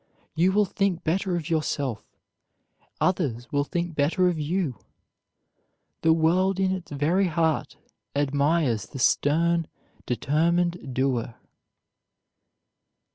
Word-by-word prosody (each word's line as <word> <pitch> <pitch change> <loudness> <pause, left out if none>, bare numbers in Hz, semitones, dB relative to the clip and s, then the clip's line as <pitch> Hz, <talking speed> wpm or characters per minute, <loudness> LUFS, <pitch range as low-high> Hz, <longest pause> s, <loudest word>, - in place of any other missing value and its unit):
You 175 +4 +3
will 205 +2 +3
think 190 -3 -1
better 185 +3 0
of 165 -3 -3
yourself; 145 -7 -1 1.0
others 140 -10 -1
will 145 -1 +1
think 170 +3 -3
better 155 +5 +2
of 170 -3 -2
you. 155 - -2 1.2
The 160 - +4
world 180 +4 +2
in 190 -1 +2
its 185 -2 -4
very 165 +7 +1
heart 165 -2 0 0.4
admires 140 - +1
the - - -9
stern, 165 +6 +2 0.4
determined 165 +2 0
doer. 125 -3 0
160 Hz, 105 wpm, -25 LUFS, 145-175 Hz, 1.2 s, The